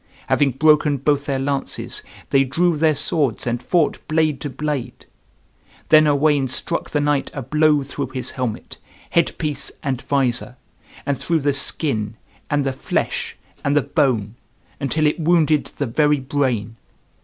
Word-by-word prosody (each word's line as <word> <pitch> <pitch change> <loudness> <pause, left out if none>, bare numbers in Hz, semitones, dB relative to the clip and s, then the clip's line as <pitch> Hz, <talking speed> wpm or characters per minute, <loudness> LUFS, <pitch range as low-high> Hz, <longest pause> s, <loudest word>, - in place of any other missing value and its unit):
Having 140 -3 +2
broken 150 +1 +3
both 145 +1 0
their 140 -1 0
lances, 135 +1 -1 0.3
they 135 0 +5
drew 170 +6 +1
their 155 0 +2
swords 140 - +1
and 120 0 -1
fought 165 -1 +1
blade 155 -3 +1
to 145 - -3
blade. 140 -3 -4 0.8
Then 155 -1 +7
Owain 145 -1 +3
struck 170 +6 -2
the 150 - 0
knight 145 -1 +1
a 135 - -4
blow 150 +1 +3
through 140 0 -4
his 130 0 -5
helmet, 125 -5 -5 0.3
head 170 - +1
piece, 150 -2 -3
and 135 -4 -2
visor, 125 -2 0 0.5
and 140 -1 -1
through 165 -2 0
the 145 0 +1
skin, 115 -6 0 0.3
and 145 -1 +1
the 135 - 0
flesh, - - -2 0.3
and 140 0 +1
the 145 - +3
bone, 115 -9 0 0.5
until 155 +3 0
it 150 +3 +1
wounded 155 -2 +3
the 140 - -4
very 150 +4 +2
brain. 130 -5 -1
145 Hz, 155 wpm, -21 LUFS, 130-155 Hz, 0.8 s, Then